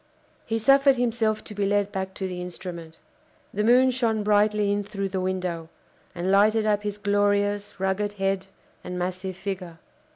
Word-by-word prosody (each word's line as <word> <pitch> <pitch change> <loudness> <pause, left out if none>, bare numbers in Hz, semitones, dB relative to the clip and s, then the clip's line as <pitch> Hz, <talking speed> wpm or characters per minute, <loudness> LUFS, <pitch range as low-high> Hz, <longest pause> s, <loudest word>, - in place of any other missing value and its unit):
He 225 - 0
suffered 275 +4 +5
himself 230 -3 0
to - - -10
be 205 0 -2
led 205 0 +1
back 190 -1 -4
to 190 - -3
the 180 -1 -5
instrument. 170 -2 -8 0.6
The 210 - 0
moon 250 +3 +5
shone 230 -4 0
brightly 210 0 +3
in 205 0 0
through 195 -1 -4
the 190 0 -2
window, 180 -3 -3 0.5
and 180 +2 -1
lighted 215 +2 +4
up 210 -1 +2
his 205 -1 -4
glorious, 205 0 0
rugged 190 +2 0
head 195 -1 -1 0.4
and 180 0 -5
massive 185 +1 -3
figure. 185 -3 -5
205 Hz, 165 wpm, -25 LUFS, 185-210 Hz, 0.6 s, suffered